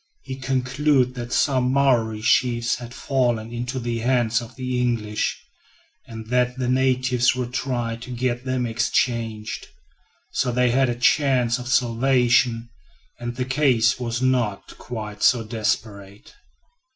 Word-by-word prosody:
He 130 - -6
concluded 130 +1 +1
that 120 -1 -7
some 130 -2 +2
Maori 120 -6 +2
chiefs 120 0 +2
had 120 -1 -9
fallen 120 -3 -1
into 125 +2 -3
the 120 -1 -3
hands 120 -1 +1
of 120 +1 -11
the 125 -1 -2
English, 110 -4 -1 0.7
and 110 -1 -8
that 125 0 +1
the 125 -1 -2
natives 130 -1 +2
would 125 -1 -4
try 120 -3 -2
to 120 +2 -11
get 125 0 -2
them 130 -1 -1
exchanged. 115 -1 -1 0.6
So 125 - 0
they 125 0 +2
had 130 +1 +2
a 120 - -1
chance 125 -2 +2
of 125 - -7
salvation, 120 -1 +2 0.5
and 120 0 -5
the 125 0 -2
case 130 -4 +2
was 120 0 -3
not 120 -6 0
quite 105 -3 -7
so 120 -2 +4
desperate. 105 -2 -4
120 Hz, 140 wpm, -23 LUFS, 115-130 Hz, 0.7 s, so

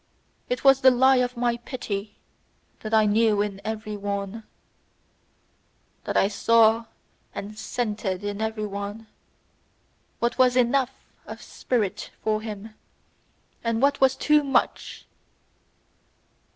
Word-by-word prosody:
It 250 - -2
was 270 -1 +6
the 260 - +8
lie 260 +1 +4
of 250 0 0
my 240 -1 +1
pity, 215 -4 -6 0.6
that 215 - -7
I 220 -1 +4
knew 210 0 +3
in 200 -1 -6
every 215 -1 -4
one, 200 +1 -4 1.6
That - - -1
I - - +4
saw 225 +2 +3 0.5
and 210 +2 -6
scented 210 -4 -3
in 205 +1 -4
every 220 -1 -2
one, 200 +2 -6 1.1
what 235 +2 -1
was 250 -1 +5
ENOUGH 255 +1 +3 0.4
of - - -9
spirit 220 -7 -2
for 215 0 0
him, 215 0 -7 0.9
and 230 -1 0
what 280 +2 +2
was 265 0 +5
TOO 300 0 +3
MUCH! 275 -1 -1
220 Hz, 120 wpm, -25 LUFS, 210-245 Hz, 1.6 s, the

